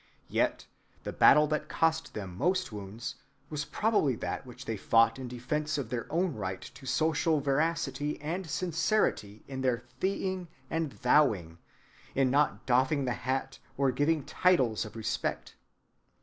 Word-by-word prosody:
Yet - - 0 0.4
the - - -4
battle 150 +2 +7
that 155 - -1
cost 165 0 0
them 95 -4 -5
most 185 - 0
wounds 105 +2 -6 0.3
was 150 -1 -2
probably 210 - +1
that 130 - -4
which 125 - -10
they 115 - -2
fought 115 +3 +3
in 130 - -5
defense 150 +6 -2
of 140 - -4
their 120 -2 -3
own 170 +1 +1
right 95 -4 -4
to 130 - -11
social 160 +2 +2
veracity 145 0 0
and 165 +4 -4
sincerity 165 - 0
in 130 -1 -5
their 125 -2 +1 0.2
thee‐ing 190 -1 -1 0.2
and 160 -3 -1
thou‐ing, 95 - +3 0.6
in 130 -1 +3
not 145 +2 +2
doffing 130 +3 +2
the 125 - 0
hat 135 +3 -3 0.2
or 135 -1 +3
giving 145 +3 +1
titles 130 - +2
of 110 - -10
respect. 110 -2 -3
135 Hz, 150 wpm, -30 LUFS, 120-160 Hz, 0.6 s, battle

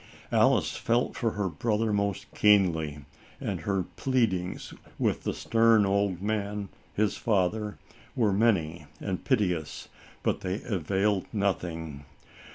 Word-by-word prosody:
Alice - - +3
felt 120 +2 0
for 115 -2 0
her 100 -2 -1
brother 110 +5 0
most 100 -2 -1
keenly, 80 -9 +3 0.3
and 95 -5 -3
her 95 +2 0
pleadings 100 -6 -1 0.2
with - - 0
the - - 0
stern 115 -2 +4
old 100 -2 0
man, 105 -1 -2 0.3
his 105 -1 +1
father, 105 0 0 0.4
were 110 -5 +2
many 85 -7 +1
and 95 -2 -3
piteous, 90 - -1 0.3
but - - 0
they 95 +3 -2
availed 100 -1 0
nothing. 85 -8 -2
100 Hz, 120 wpm, -28 LUFS, 90-110 Hz, 0.4 s, stern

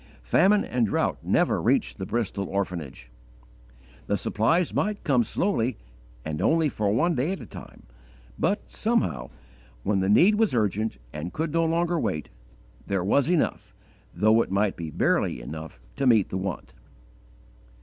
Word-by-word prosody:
Famine 195 - +3
and 120 -3 0
drought - - 0
never - - +1
reached - - +1
the - - -4
Bristol 100 -4 -2
orphanage: 85 -11 -4 1.0
the - - +1
supplies 160 +10 +1
might 210 0 -1
come 130 -4 +3
slowly 125 - -1 0.5
and 75 -1 -3
only 160 -2 +3
for 105 -6 -1
one 170 +11 +2
day 145 +6 0
at 195 - -6
a 120 - -9
time, - - -12 0.6
but 205 +2 -1
somehow, 90 - -1 0.5
when 100 -1 +1
the 95 +1 0
need 180 - +6
was 220 - +2
urgent 110 - 0 0.2
and 75 +4 -5
could 160 0 -2
no 165 0 +2
longer 170 +1 +1
wait, 75 - -2 0.6
there 95 -2 0
was 140 - +2
enough 175 -4 0 0.4
though 110 +2 +3
it - - -3
might 100 +1 +1
be 80 -2 -6
barely 70 - +1
enough 80 +1 -8 0.2
to 135 - +1
meet 110 -6 +4
the 95 - -3
want. 95 -2 -5
110 Hz, 155 wpm, -26 LUFS, -, 1.0 s, need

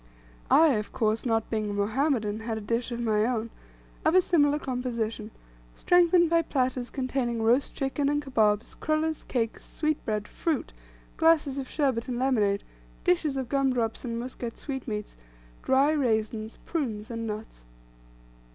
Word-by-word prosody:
I, 320 +2 +7
of 210 - -4
course, 220 +2 0
not 225 -1 0
being 215 -2 -1
a - - -3
Mohammedan, 215 +1 0
had 225 0 -3
a - - -5
dish 230 +4 -2
of 235 - -3
my 215 -3 +2
own, 230 -1 -1 0.5
of 315 +3 +3
a 370 - +8
similar 295 -5 +3
composition, 235 -5 -3 0.5
strengthened 350 -1 +4
by 335 0 +3
platters 255 -5 -1
containing 255 -3 -2
roast 240 +5 +2
chicken, 275 +1 0
and 290 0 +1
kabobs, 220 -6 +1
crullers, 310 0 -1
cakes, 230 -3 -2
sweetbread, 220 -9 -2
fruit, 325 -3 -2 0.4
glasses 315 -4 +3
of 265 - -6
sherbet 265 -6 0
and 245 -2 -2
lemonade, 215 -6 +1 0.4
dishes 335 -6 +1
of 260 -2 -2
gum 275 0 +1
drops 225 -3 -1
and 235 -2 -3
Muscat 240 -1 -6
sweetmeats, 240 -7 -5 0.4
dry 270 +3 +3
raisins, 220 -6 -1
prunes, 230 -10 -3
and 230 -1 -4
nuts. 210 - -7
245 Hz, 150 wpm, -27 LUFS, 220-285 Hz, 0.5 s, a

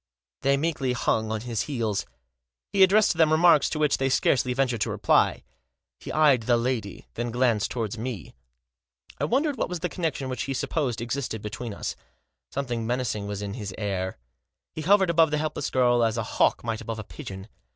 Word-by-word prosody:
They 140 +1 +3
meekly 140 -4 -1
hung 110 -2 0
on 110 -1 -2
his 115 -3 -2
heels. 115 -7 -1 0.7
He 195 - +2
addressed 200 +3 +6
to 165 - -5
them 155 -1 +5
remarks 160 -1 +5
to - - -3
which 150 -1 +2
they 135 0 +1
scarcely 125 -1 +2
ventured 125 -3 0
to - - +1
reply. - - +2 0.6
He - - -7
eyed 150 -6 +4
the 120 +1 +2
lady. 115 -5 -3
Then 120 +1 -3
glanced 120 -3 +1
towards 115 -2 -3
me. 115 - -5 0.9
I - - +1
wondered 280 +3 +1
what - - -1
was 180 -2 -4
the 180 - -1
connection 160 -7 -2
which 130 -2 -3
he 135 - -3
sup - - -3
posed 130 -8 -1
existed 120 -3 -3
between 105 +2 -5
us. - - -4 0.5
Something 120 -5 -3
menacing 120 -4 -2
was 105 0 -4
in 100 -1 -4
his 100 -5 -6
air. 95 -3 -3 0.6
He 155 - -5
hovered 190 +2 +4
above 165 -1 +4
the 150 - 0
helpless 150 -1 -2
girl 120 -2 +3
as 115 -1 +1
a - - 0
hawk - - +1
might 115 -1 -3
above 115 0 -5
a 110 - -5
pigeon. 95 -5 -9
125 Hz, 195 wpm, -26 LUFS, 110-150 Hz, 0.9 s, addressed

